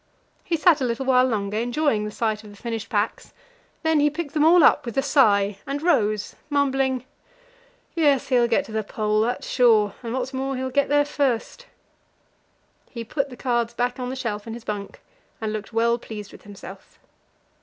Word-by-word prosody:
He 335 - -1
sat 320 -2 +4
a - - +1
little 245 +1 -2
while 255 -1 +4
longer, 210 -3 -2
enjoying 240 -2 0
the - - -3
sight 215 0 -2
of 210 - -12
the 205 - -13
finished 225 0 -5
packs; 210 -1 -2 0.5
then 320 -1 +3
he 295 +1 +4
picked 300 -1 -5
them 300 -2 +2
all 335 +1 +6
up 295 - +5
with 235 -2 -6
a 270 - +3
sigh, 210 -8 +3
and 280 +1 -2
rose, 215 - +1
mumbling: 270 -3 +1 0.9
"Yes, 290 -6 +2
he'll 245 -2 +3
get 235 - +1
to - - -11
the 220 0 -1
Pole, 215 +1 0
that's 240 +3 -2
sure; 220 -5 +3
and, 230 -2 -5
what's 260 +2 -3
more, 270 +1 -2
he'll 260 0 -3
get 280 +2 +1
there 290 0 +3
first." 285 - -2 1.2
He 235 -2 -6
put 275 +4 -2
the 250 - -11
cards 235 -2 -1
back 245 +1 -1
on 250 0 -3
the 260 - -4
shelf 225 -5 -4
in 225 - -5
his 235 - -10
bunk, 205 -2 -6 0.4
and 220 -1 -3
looked 215 +1 -6
well 235 +1 +2
pleased 210 -3 -8
with - - -15
himself. 195 -1 -12
245 Hz, 195 wpm, -23 LUFS, 215-275 Hz, 1.2 s, all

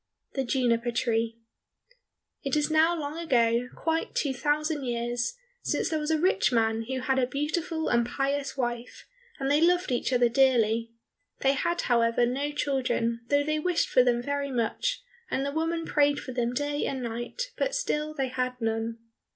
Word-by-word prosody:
47 270 -1 -1
The - - -5 0.3
Juniper 240 0 -2
Tree 230 -1 0 1.0
It 275 -1 -1
is 300 +1 +1
now 325 +2 +4
long 295 +2 -4
ago, 245 -6 +2
quite 325 0 -1
two 280 -3 0
thousand 295 +2 0
years, 240 - -2 0.3
since - - 0
there 315 - +1
was 300 0 -3
a 320 - +3
rich 360 -1 +2
man 225 -1 +1
who 260 0 -2
had 265 +1 +1
a 250 - +2
beautiful 310 +4 -2
and 235 0 +3
pious 275 +3 -2
wife, 240 -1 -3 0.3
and 270 0 0
they 295 +2 +4
loved 355 -1 +3
each 245 +1 0
other 245 -1 +4
dearly. 230 -3 +3 0.5
They 270 0 +4
had, 340 +5 0
however, 235 0 +3
no 275 +4 -1
children, 255 -5 0
though 285 +1 +3
they 305 +1 0
wished 350 +2 +1
for 255 - +5
them 240 -1 +2
very 285 +1 -2
much, 270 - -1 0.3
and 270 - -1
the 280 - -1
woman 330 +2 -1
prayed 290 -2 +2
for 255 - -7
them 240 -1 -1
day 290 +2 -1
and 265 -2 -3
night, 240 - -4
but - - -1
still 305 -11 -1
they 270 -3 -1
had 255 0 -2
none. 225 0 -1
270 Hz, 180 wpm, -28 LUFS, 240-305 Hz, 1.0 s, for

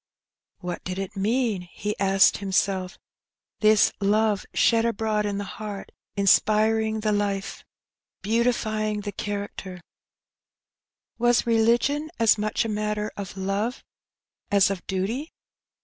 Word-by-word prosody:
" - - -64
What 180 -1 -5
did 185 0 -4
it 195 +1 -5
mean? 215 0 0
" 175 -1 -15
he 210 0 -1
asked 195 0 +4
himself, 190 -1 -1 0.3
" - - -67
this 215 -1 +5
love 210 0 +1
shed 230 -1 +3
abroad 220 -2 0
in 200 -1 -2
the 205 - -3
heart, 200 0 -7 0.2
inspiring 220 +2 +3
the 215 0 +1
life, 200 -1 -2 0.6
beautifying 215 -1 0
the 205 - -5
cha - - -6 0.3
232 190 - -7
Her 185 - -8
Benny. - - -12
racter? - - -21 1.4
Was 240 0 +3
religion 235 +7 +2
as 225 -2 +4
much 215 +2 0
a - - -2
matter 210 0 -2
of 195 -1 -7
love 200 +6 -2 0.7
as 200 -1 +4
of 190 -3 -5
duty?" 215 - -2
210 Hz, 145 wpm, -25 LUFS, 195-220 Hz, 1.4 s, this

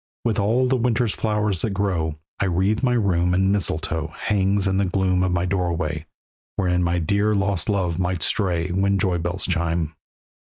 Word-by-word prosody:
With 115 -2 +1
all 115 +6 +2
the 130 +1 +2
winter's 120 -2 +1
flowers 105 -4 0
that 105 -3 -2
grow 90 -6 -1 0.2
I - - +1
wreathed 95 +4 +1
my 125 -2 +2
room, 90 -6 +2
and 95 +1 +3
mistletoe 80 -4 -1
Hung 100 +4 0
in 95 0 +1
the 100 - +2
gloom 90 0 +1
of 95 0 +1
my 90 0 0
doorway, 85 -4 -2 0.5
Wherein 90 -2 +1
my 85 0 +1
dear 100 +5 +1
lost 95 -3 0
love 90 -4 0
might 90 -2 -1
stray 90 -4 0
When 100 +2 +1
joy 90 -2 +1
bells 85 +3 -2
chime. 85 -1 -1
95 Hz, 180 wpm, -23 LUFS, 85-100 Hz, 0.5 s, and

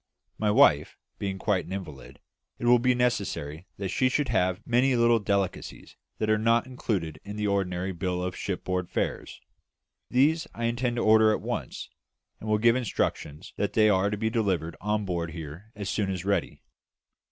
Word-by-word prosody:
My 105 - +1
wife 105 - +4 0.2
being 95 -1 -3
quite 95 -1 0
an - - -9
invalid, 75 -9 -8 0.4
it - - -5
will 120 0 +6
be 125 +1 +2
necessary 95 -9 -1
that 95 -1 -3
she 130 +7 +2
should 140 +1 0
have 95 -2 0
many 125 +2 +3
little 120 -1 +4
delicacies 100 -2 -3 0.2
that 110 - -1
are 110 0 +3
not 115 +2 +3
included 95 -11 -3
in 100 +1 -7
the 105 0 -2
ordinary 95 -2 -1
bill 90 0 -2
of 90 0 -3
shipboard 90 -2 -3
fare. - - -2 0.9
These 155 +6 +2
I 115 - -5
intend 120 +1 0
to 120 - -1
order 110 0 +6
at - - -1
once, - - -4 0.5
and 110 - -6
will 105 - +3
give 115 +2 +4
instructions 95 - -3
that 100 - -1
they 110 -1 +5
are 95 0 +3
to 105 - -3
be 110 +1 -1
delivered 95 -8 -1
on 105 0 -1
board 85 -3 -3
here 80 +6 -9
as 100 -2 -5
soon 100 -1 -1
as 95 -1 -4
ready. 100 -3 -1
105 Hz, 180 wpm, -27 LUFS, 90-115 Hz, 0.9 s, will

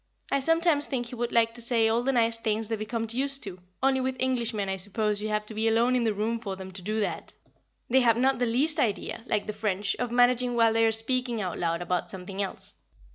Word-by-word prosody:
I 275 - +2
sometimes 325 0 +3
think 250 -3 -2
he 240 - -8
would 240 0 -2
like 230 -1 +3
to 240 - -2
say 230 -1 +3
all 225 +2 +2
the 270 +2 +1
nice 230 -2 +3
things 220 -1 -1
the 225 - 0
Vicomte 225 +1 -3
used 275 +2 0
to, 190 -4 -6 0.2
only 265 -1 +3
with 260 0 -2
Englishmen 235 -5 0
I 190 0 -2
suppose 205 +2 -1
you 215 - -3
have 210 0 -1
to 220 - -2
be 220 +1 0
alone 235 +3 +3
in 245 -2 +1
the 220 - +1
room 225 +3 -1
for 200 -4 -5
them 190 0 -9
to 185 0 -6
do 215 +4 -2
that; - - -3 0.5
they 260 +2 +4
have 230 -3 +3
not 265 +1 +2
the 245 - +1
least 295 +7 +1
idea, 220 -2 -1
like 210 - 0
the 215 - -4
French, 205 -1 -1
of 245 - -2
managing 245 0 +3
while 230 -1 +4
they 225 0 +3
are - - +3
speaking 240 +1 +1
out 185 -4 -3
loud 170 0 -1
about 180 0 -2
something 190 +1 -5
else. 195 - -4
230 Hz, 245 wpm, -27 LUFS, 210-250 Hz, 0.5 s, they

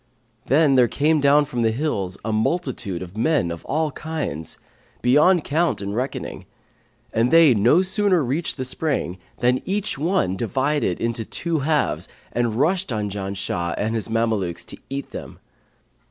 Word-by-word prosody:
[FN#539] 115 -2 -38
Then 145 +1 +4
there 125 -1 +6
came 150 +4 +2
down 145 +1 +5
from 125 -3 -3
the 115 - +3
hills 110 -8 -2
a 110 - -1
multitude 110 - -1
of 90 +2 -11
men 120 - +1
of 85 - -7
all 155 +2 0
kinds, 145 - -4 0.5
beyond 150 +7 +5
count 165 +4 +1
and 100 0 -4
reckoning; 130 +4 -4 0.7
and 115 +2 +2
they 165 -4 +7
no 120 - +4
sooner 190 -3 +2
reached 145 +7 -1
the 130 - -3
spring, 130 - -2 0.2
than 125 +1 +2
each 200 -5 -2
one 160 - +1
divided 130 - 0
into 115 0 -2
two 165 +7 -2
halves 140 - 0 0.2
and 120 -2 0
rushed 175 +8 +1
on 105 -3 -2
Janshah 95 -3 -3
and 110 +2 -1
his 115 -1 -2
Mamelukes 110 -6 -1
to - - -7
eat 140 0 -5
them. - - -8
125 Hz, 160 wpm, -22 LUFS, 110-155 Hz, 0.7 s, they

